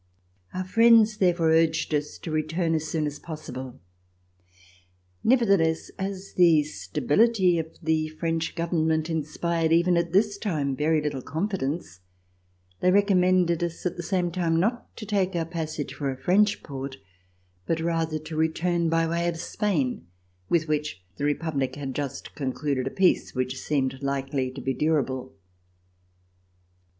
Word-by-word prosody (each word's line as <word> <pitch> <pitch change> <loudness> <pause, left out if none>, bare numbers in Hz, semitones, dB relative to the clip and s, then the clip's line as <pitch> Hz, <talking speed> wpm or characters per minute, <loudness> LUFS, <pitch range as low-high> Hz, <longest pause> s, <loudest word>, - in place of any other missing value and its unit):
Our 185 - -3
friends, 225 +2 +5
therefore, 175 -4 +3
urged 160 -1 +2
us 150 0 -1
to 165 - -4
return 160 +2 0
as 160 -1 -1
soon 155 -1 -1
as 145 0 -4
possible. 130 -5 -8 1.4
Nevertheless, 200 -10 +3
as 190 0 -5
the 165 -4 +5
stability 180 +5 +2
of 160 - -3 0.2
the 160 0 +1
French 165 +1 -2
Government 160 -1 0
inspired, 160 +1 -1
even 170 +1 +4
at 170 0 0
this 200 +2 +2
time, 150 -10 -1
very 155 +2 +1
little 145 -3 -2
confidence, 155 - -3 0.8
they 180 - +3
recommended 185 -3 +3
us 170 +1 -4
at 180 - -1
the - - -5
same 175 -1 0
time 165 -2 +1
not 230 +7 -2
to 215 - -6
take 195 -3 0
our 165 -1 0
passage 160 -3 -4
for 140 -2 -3
a 130 - -4
French 200 +9 +2
port, 135 -1 -6 0.7
but 165 - 0
rather 165 -1 0
to 155 +1 -8
return 165 +2 +1
by 165 0 +2
way 170 +1 0
of 170 -1 -1
Spain, 165 - -1 0.4
with 165 -2 +2
which 150 -9 -2
the 145 - -2
Republic 145 -3 -1
had 140 -2 -5
just 140 -1 -5
concluded 135 -1 -2
a - - 0
peace 185 -1 +2
which 130 +1 -2
seemed 135 -3 -1
likely 135 -1 -1
to 130 +1 -8
be 135 - -1
durable. 130 -3 -1
160 Hz, 145 wpm, -26 LUFS, 145-180 Hz, 1.4 s, friends